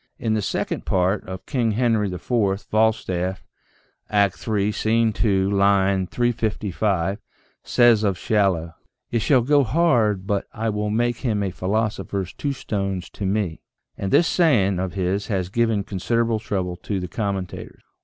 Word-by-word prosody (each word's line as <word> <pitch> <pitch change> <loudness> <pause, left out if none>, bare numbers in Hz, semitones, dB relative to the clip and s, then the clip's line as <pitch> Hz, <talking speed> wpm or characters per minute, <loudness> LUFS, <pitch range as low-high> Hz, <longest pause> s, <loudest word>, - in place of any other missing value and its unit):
In 110 - -1
the 110 - +1
second - - -2
part 95 +2 +1
of 95 0 -7
"King 115 -5 0
Henry 110 -3 +1
IV," 100 +1 0
Falstaff 95 -4 0 0.6
(Act 100 -1 +1
III, 105 -1 +1
Scene 110 +1 +1
2, 100 -3 +1
line 100 -1 +3
355), 105 -5 -1 0.4
says 120 -3 +4
of 100 -3 +1
Shallow: 95 -7 +1 0.2
" - - -54
it 115 - +1
shall 125 +2 +3
go 145 +2 +4
hard 115 - +2
but 100 -1 -1
I 110 +1 -2
will 105 0 -2
make 120 +2 0
him 110 -6 -1
a 95 - -2
philosopher's 100 0 -2
two 145 - -2
stones 100 -8 -3
to 100 - -4
me," 95 -5 -1 0.3
and 95 - -4
this 175 - +5
saying 105 - +3
of 95 -1 -3
his 95 +1 -1
has 95 -4 -1
given 115 -1 +1
considerable 115 +4 0
trouble 95 -4 -3
to 100 +1 -3
the 90 - -4
commentators. 100 -6 -4
105 Hz, 155 wpm, -23 LUFS, 95-115 Hz, 0.6 s, this